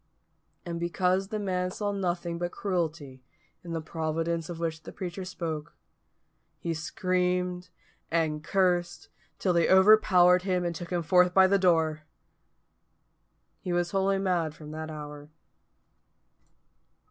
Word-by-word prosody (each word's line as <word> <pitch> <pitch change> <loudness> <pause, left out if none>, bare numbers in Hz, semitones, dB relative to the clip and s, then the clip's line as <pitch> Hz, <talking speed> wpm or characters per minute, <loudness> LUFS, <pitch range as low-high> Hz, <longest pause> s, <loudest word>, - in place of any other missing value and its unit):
And 170 -1 -4
because 180 +2 0
the 215 +1 -3
man 185 -3 -1
saw 205 +2 -3
nothing 175 -3 -2
but 175 0 -2
cruelty 160 -8 -3 0.4
in 170 - -8
the 165 - -2
Providence 165 +1 -2
of 175 - -5
which 160 -2 -3
the - - -10
preacher 185 0 -6
spoke, 165 -3 -5 0.8
he 170 - -3
screamed 180 +2 -1 0.4
and 160 -2 0
cursed, 175 -4 0 0.3
till 185 - +1
they 170 -1 +2
overpowered 190 -2 +6
him 180 -1 -1
and 170 - -1
took 170 +1 -7
him 175 -2 -1
forth 180 +1 +4
by 190 -1 +7
the 200 +1 +3
door. 160 -4 +2 1.6
He 185 - -5
was 175 0 0
wholly 195 0 +1
mad 175 -5 0
from 150 -1 -10
that 155 0 -6
hour. 150 -1 -8
175 Hz, 135 wpm, -28 LUFS, 160-185 Hz, 1.6 s, by